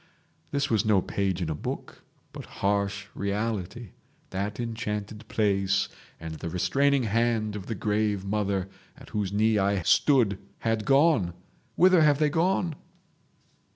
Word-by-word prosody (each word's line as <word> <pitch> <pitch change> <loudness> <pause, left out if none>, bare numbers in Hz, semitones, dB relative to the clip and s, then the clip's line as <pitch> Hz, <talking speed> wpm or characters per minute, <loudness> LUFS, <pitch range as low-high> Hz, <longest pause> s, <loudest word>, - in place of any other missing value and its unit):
This 140 -1 0
was 110 -4 +2
no 105 -3 +4
page 95 -1 -1
in 80 - -3
a - - 0
book, 75 - -6 0.3
but - - -8 0.2
harsh 100 0 0
reality; 105 +1 -3 0.4
that 100 +3 -3
enchanted 110 -2 -4
place 100 -3 +1 0.3
and 80 -1 -7
the 85 - -4
restraining 140 +10 +2
hand 110 -1 0
of 100 -3 -7
the 115 - -3
grave 105 -1 0
mother 100 -2 -1 0.3
at - - -14
whose 105 -3 -2
knee 110 +1 +2
I 100 -1 +1
stood 115 - +3 0.2
had 115 -2 0
gone—whither 140 - +2
have 150 -2 +5
they 150 0 +2
gone?" 175 +1 +1
105 Hz, 135 wpm, -27 LUFS, 100-120 Hz, 0.4 s, have